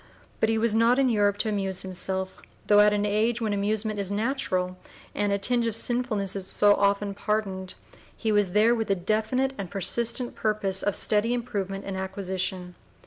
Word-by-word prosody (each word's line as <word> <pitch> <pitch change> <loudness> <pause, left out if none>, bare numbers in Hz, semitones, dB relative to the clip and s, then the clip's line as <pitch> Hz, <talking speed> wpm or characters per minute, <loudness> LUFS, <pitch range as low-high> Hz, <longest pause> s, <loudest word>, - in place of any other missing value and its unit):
But 220 - +2
he 225 - +1
was 225 0 +1
not 230 +3 +3
in 270 -2 +3
Europe 205 -3 +2
to 220 - 0
amuse 195 -3 -2
himself, 190 0 -4 0.2
though 205 0 +5
at 210 0 +6
an 205 0 0
age 220 +3 +1
when 220 -3 -1
amusement 210 +1 -1
is 195 -2 -2
natural 200 -5 -1 0.4
and 205 0 0
a 200 - +2
tinge 235 +3 +1
of 225 - 0
sinfulness 225 -5 -1
is 190 -1 -3
so 205 +1 +5
often 200 0 +1
pardoned; 195 -3 -2 0.4
he 220 - -1
was 205 -4 +2
there 215 +3 +4
with 225 -2 -2
the 195 - +2
definite 220 +8 0
and 195 -3 -5
persistent 235 +6 0
purpose 205 -3 0
of 205 - +1
steady 220 +3 +2
improvement 200 -5 -4
and 195 -1 -4
acquisition. 190 -1 -4
205 Hz, 185 wpm, -26 LUFS, 195-225 Hz, 0.4 s, at